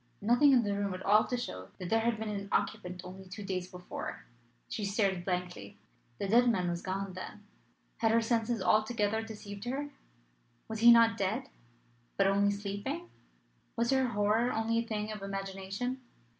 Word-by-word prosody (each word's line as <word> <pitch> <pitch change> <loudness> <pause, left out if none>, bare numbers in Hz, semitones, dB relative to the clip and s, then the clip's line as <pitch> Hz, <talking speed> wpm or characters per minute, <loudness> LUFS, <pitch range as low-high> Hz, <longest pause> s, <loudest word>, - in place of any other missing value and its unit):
Nothing 245 +7 +5
in 250 -3 +5
the 205 -1 0
room 200 -2 -1
at 185 - -8
all 210 +2 +5
to 250 - -1
show 95 - -5
that 180 -2 -6
there 225 - +4
had 230 0 +1
been 220 0 -4
an 200 -1 -4
occupant 180 0 -1
only 190 +1 -9
two 190 +3 -7
days 185 -2 -3
before. 180 0 -7 0.4
She 215 - -4
stared 200 -3 +1
blankly. 180 - -4 0.4
The 200 - -2
dead 240 +4 +5
man 180 -6 +1
was 170 0 -3
gone, 195 0 -3
then. 195 +3 -8 0.5
Had 225 - +2
her 230 - +5
senses 230 -2 0
altogether 215 +1 +2
deceived 210 -1 -8
her? 280 +4 -3 0.8
Was 220 -1 -4
he 235 +1 +9
not 230 -1 +6
dead, 220 +7 -1 0.7
but 195 - +4
only 200 +1 +3
sleeping? 205 - -4 0.6
Was 235 +2 +1
her 265 -1 +3
horror 215 +2 +2
only 225 +1 +1
a 230 - -3
thing 215 -1 -2
of 210 -2 -6
imagination? 195 +6 -4
210 Hz, 175 wpm, -31 LUFS, 195-230 Hz, 0.8 s, he